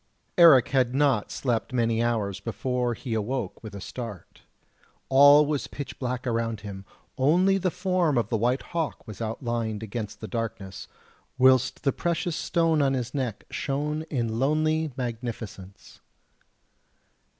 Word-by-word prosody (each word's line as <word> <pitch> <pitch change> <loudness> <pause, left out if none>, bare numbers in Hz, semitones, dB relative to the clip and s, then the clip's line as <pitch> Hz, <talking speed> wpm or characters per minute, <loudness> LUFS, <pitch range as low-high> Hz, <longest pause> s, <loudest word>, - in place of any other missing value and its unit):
Eric 160 -8 +7
had 130 -1 +1
not 135 -7 +2
slept 120 -1 -2
many 115 -2 +1
hours 105 -5 -1
before 120 +2 -2
he 120 -1 -5
awoke 110 -1 -3
with 110 -3 -9
a - - -6
start. 105 -3 -8 0.7
All 145 +2 +7
was 145 -1 -2
pitch 140 - -7
black 125 -1 -3
around 115 -2 -1
him, 100 -2 -8 0.3
only 180 +8 +4
the 185 0 +1
form 180 -5 +1
of 120 - 0
the 115 - 0
white 120 +4 +1
hawk 165 -3 -4
was 105 0 -9
outlined 115 -1 -3
against 110 -1 -5
the 110 - -6
darkness, 100 -6 -5 0.5
whilst 130 0 +4
the 135 - +2
precious 170 -1 -1
stone 165 -3 +1
on 135 -1 +2
its 125 -1 -3
neck 130 -7 -3
shone 150 +2 -2
in 115 -5 -1
lonely 155 +3 +1
magnificence. 115 -6 -6
125 Hz, 140 wpm, -26 LUFS, 115-145 Hz, 0.7 s, Eric